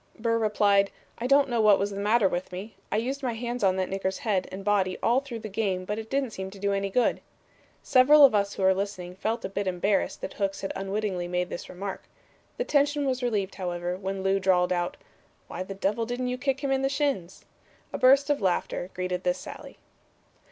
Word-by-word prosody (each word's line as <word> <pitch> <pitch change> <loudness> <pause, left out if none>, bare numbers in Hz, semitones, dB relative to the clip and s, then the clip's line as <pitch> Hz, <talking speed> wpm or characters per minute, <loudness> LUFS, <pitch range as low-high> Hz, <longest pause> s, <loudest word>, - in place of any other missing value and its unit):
Burr 230 0 +1
replied, 205 -2 +3 0.3
'I 240 - -1
don't 275 +1 +5
know 240 -3 +1
what 210 -2 +6
was 200 +1 -1
the 200 - -5
matter 210 +1 +3
with 180 0 -3
me. 195 +4 -7 0.2
I 210 - +1
used 265 +5 -2
my 250 -3 -1
hands 240 +1 -4
on 190 -1 +4
that 190 -1 -1
nigger's 190 0 -2
head 200 -5 -1
and 195 +1 -7
body 195 -3 +1
all 240 +3 +4
through 255 -5 -7
the 215 - -5
game 195 -3 -1
but 210 +3 -3
it 220 0 -8
didn't 270 -3 0
seem 190 -2 -5
to 195 - -12
do 200 +1 0
any 195 0 -1
good.' 245 +5 +1 0.6
Several 285 +3 +7
of 265 - +4
us 200 -1 +1
who 195 - -3
were 190 0 +6
listening 185 -2 -4
felt 225 +4 -2
a - - 0
bit 195 0 -3
embarrassed 190 +2 0
that - - -5
Hooks 195 -1 -2
had 195 - -3
unwittingly 195 -2 -2
made 180 0 -1
this - - -6
remark. 190 +1 -6 0.5
The - - 0
tension 290 - +2
was 260 -1 -1
relieved, 210 -6 -1
however, 175 -1 -3
when 190 0 -4
Lew 195 0 +2
drawled 185 -1 +3
out, 175 0 -2 0.5
'Why - - -6
the 195 +1 -5
devil 205 +4 -1
didn't 250 +1 -2
you 250 - -2
kick 270 0 -1
him 275 -2 -1
in 265 0 +2
the 270 - +1
shins?' 275 - -2 0.5
A - - -3
burst 275 +3 +5
of 285 - 0
laughter 180 -1 -1
greeted 180 0 -2
this 180 0 +1
sally." - - -10
200 Hz, 220 wpm, -27 LUFS, 190-245 Hz, 0.6 s, Several